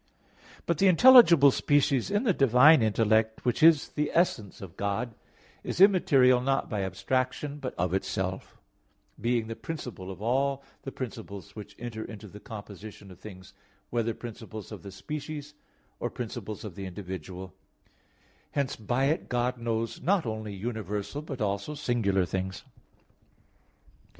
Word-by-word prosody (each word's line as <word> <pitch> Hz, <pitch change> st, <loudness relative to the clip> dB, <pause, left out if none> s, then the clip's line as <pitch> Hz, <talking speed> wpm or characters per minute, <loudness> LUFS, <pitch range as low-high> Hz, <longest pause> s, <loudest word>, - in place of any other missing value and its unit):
But 170 Hz, -3 st, 0 dB
the 195 Hz, -, +5 dB
intelligible 175 Hz, -, +8 dB
species 145 Hz, -1 st, +2 dB
in 205 Hz, +3 st, +1 dB
the 215 Hz, -7 st, +3 dB
divine 135 Hz, +2 st, +6 dB
intellect, 110 Hz, +1 st, +1 dB
which 125 Hz, -, 0 dB
is 160 Hz, -2 st, +6 dB
the 150 Hz, 0 st, -2 dB
essence 125 Hz, -, +1 dB
of 95 Hz, -2 st, -10 dB
God, 100 Hz, +5 st, -2 dB, 0.5 s
is -, -, -4 dB
immaterial 140 Hz, -10 st, +5 dB
not 135 Hz, +1 st, 0 dB
by 105 Hz, -3 st, -1 dB
abstraction, 130 Hz, +10 st, -2 dB
but 130 Hz, -3 st, -5 dB
of 90 Hz, 0 st, -1 dB
itself, 95 Hz, -1 st, -3 dB, 0.6 s
being 120 Hz, -1 st, 0 dB
the 115 Hz, 0 st, -6 dB
principle 120 Hz, -, -7 dB
of 95 Hz, -, -8 dB
all 135 Hz, +5 st, 0 dB, 0.2 s
the 135 Hz, -, -6 dB
principles 110 Hz, -8 st, -8 dB
which 105 Hz, -1 st, -10 dB
enter 115 Hz, -2 st, -6 dB
into 110 Hz, -1 st, -9 dB
the 105 Hz, +1 st, -12 dB
composition 105 Hz, -2 st, -10 dB
of 90 Hz, -, -14 dB
things, 95 Hz, -2 st, -12 dB, 0.4 s
whether 115 Hz, -1 st, -1 dB
principles 110 Hz, -2 st, -9 dB
of 105 Hz, -, -8 dB
the 100 Hz, -, -9 dB
species 150 Hz, +7 st, -6 dB, 0.5 s
or -, -, -2 dB
principles 110 Hz, -3 st, -6 dB
of 105 Hz, -4 st, -7 dB
the 95 Hz, 0 st, -6 dB
individual; 95 Hz, -1 st, -7 dB, 1.0 s
hence 140 Hz, -2 st, -1 dB
by 120 Hz, +5 st, -1 dB
it 155 Hz, +4 st, 0 dB
God 125 Hz, 0 st, -1 dB
knows 115 Hz, -1 st, -2 dB
not 185 Hz, -2 st, +2 dB
only 110 Hz, -2 st, -4 dB
universal, 105 Hz, +4 st, -4 dB
but 140 Hz, -5 st, -7 dB
also 100 Hz, +8 st, -2 dB
singular 110 Hz, -9 st, +1 dB
things. 95 Hz, +1 st, -4 dB
115 Hz, 145 wpm, -28 LUFS, 100-140 Hz, 1.0 s, intelligible